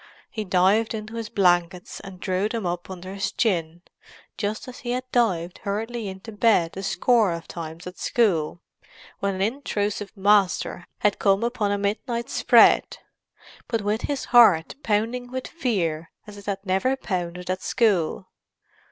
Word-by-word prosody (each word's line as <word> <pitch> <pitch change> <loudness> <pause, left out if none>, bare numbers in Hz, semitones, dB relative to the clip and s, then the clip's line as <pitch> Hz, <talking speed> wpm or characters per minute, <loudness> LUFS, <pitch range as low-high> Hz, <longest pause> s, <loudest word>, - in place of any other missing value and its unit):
He 220 - -3
dived 195 +4 +2
into 215 0 -7
his 230 -2 -5
blankets 180 -3 +1
and 195 -2 -11
drew 190 +2 -1
them 225 -4 -3
up 175 0 -3
under 185 0 -7
his 200 0 -2
chin, 175 -6 -1 0.5
just 215 +4 -3
as 255 - -9
he 240 0 -3
had 255 +1 -2
dived 185 -8 +1
hurriedly 220 +2 -3
into 190 +3 -8
bed 205 -6 +2
a 195 - -5
score 220 +1 +2
of 170 0 -5
times 165 0 -7
at 180 0 -9
school 175 -8 +1 0.6
when 200 -1 -1
an 190 - -1
intrusive 210 -4 -2
master 195 -3 +2
had 205 -1 +2
come 195 +1 +3
upon 235 -4 0
a 205 - +1
midnight 235 +4 -2
"spread"; - - +5 0.7
but 225 -3 -1
with 210 +3 0
his 285 -2 -3
heart 200 -9 +6
pounding 230 +3 -1
with 260 0 -4
fear 175 - -2 0.2
as 210 - -11
it 200 0 -13
had 195 0 -3
never 195 +8 +1
pounded 180 -7 -4
at 185 0 -3
school. 195 -6 +1
200 Hz, 160 wpm, -24 LUFS, 180-225 Hz, 0.7 s, heart